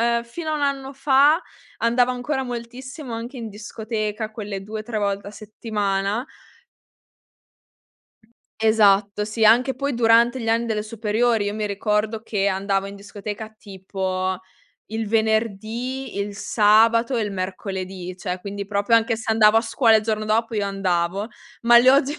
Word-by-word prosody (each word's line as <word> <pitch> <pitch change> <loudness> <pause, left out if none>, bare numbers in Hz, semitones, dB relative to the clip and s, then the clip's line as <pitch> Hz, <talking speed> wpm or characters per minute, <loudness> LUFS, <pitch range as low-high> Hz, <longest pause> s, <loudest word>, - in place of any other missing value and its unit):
uhm, 235 0 +1
fino 310 +7 -6
a - - 0
1 290 - -3
anno 275 -1 -1
fa 280 +4 +4 0.4
andavo 245 +2 +2
ancora 265 +2 -2
moltissimo 250 +2 -7
anche 235 +4 -6
in 230 -3 -5
discoteca, 215 0 -4
quelle 205 -3 -6
2-3 215 +1 -4
volte 200 0 -2
a - - -8
settimana. 210 +1 -2 2.3
Esatto, 210 -2 +3
sì, 220 +1 -1
anche 245 +5 +5
poi 280 -1 -2
durante 235 +2 +4
gli 225 - -3
anni 230 +1 +2
delle 215 -2 -1
superiori: 220 0 0
io 205 - -2
mi 215 0 -2
ricordo 210 +2 -1
che 200 -2 0
andavo 195 0 0
in 200 0 -8
discoteca 205 +2 -7
tipo 190 -2 -3 0.5
il 220 0 -4
venerdì, 225 +3 -1
il 200 0 -3
sabato 230 +4 +3
e 230 - +1
il 210 - -3
mercoledì, 185 -1 -5
cioè 180 -1 -4
quindi 200 +1 -5
proprio 205 +3 +2
anche 230 +1 +1
se 225 0 -4
andavo 220 0 +5
a - - +2
scuola 225 0 +3
il 215 - +1
giorno 215 -1 -1
dopo 225 +2 0
io 205 - 0
andavo; 195 +1 -1 0.3
ma 235 0 +7
le 250 +2 +5
ho 275 +2 +5
gi 290 +5 -5
220 Hz, 155 wpm, -22 LUFS, 200-235 Hz, 2.3 s, ma